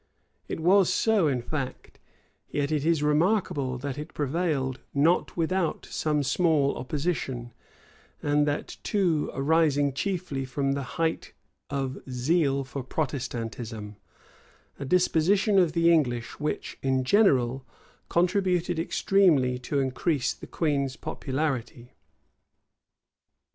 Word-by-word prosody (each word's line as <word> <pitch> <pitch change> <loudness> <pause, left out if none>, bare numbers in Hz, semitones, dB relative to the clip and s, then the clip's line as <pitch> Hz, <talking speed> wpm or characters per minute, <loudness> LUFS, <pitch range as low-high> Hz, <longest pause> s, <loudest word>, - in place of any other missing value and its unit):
It - - -4
was 185 +3 +4
so 205 -2 +3
in 130 -4 -1
fact; 135 -1 -5 0.5
yet 145 0 -1
is 150 -1 0
it 165 -3 +2
remarkable, 150 -5 +1
that 140 +2 -5
it 150 +2 -8
prevailed 145 -3 -1 0.2
not 160 +7 +2
without 170 0 0
some 150 -2 0
small 145 0 +2
opposition; 130 -3 -3 0.7
and 145 0 +1
that 145 0 -3
too 180 -8 +1
arising 145 -1 +2
chiefly 170 -4 -2
from 135 +1 -1
the 140 0 -1 0.2
height 165 0 -1 0.4
of 135 -2 -3
zeal 140 +2 +1
for 135 +1 -6
Protestantism; 120 -6 -4 0.8
a - - -4
disposition 185 - +3
of 170 -4 +2
the 170 0 +4
English 120 -7 0
which, 150 +1 -3
in 130 -1 +1
general, 135 - +3 0.5
contributed 180 -1 +1
extremely 165 -8 +2
to 130 +3 -3
increase 135 +1 0
the - - -12
queen's 140 -4 -1
popularity. 130 -5 -4
145 Hz, 110 wpm, -27 LUFS, 130-170 Hz, 0.8 s, was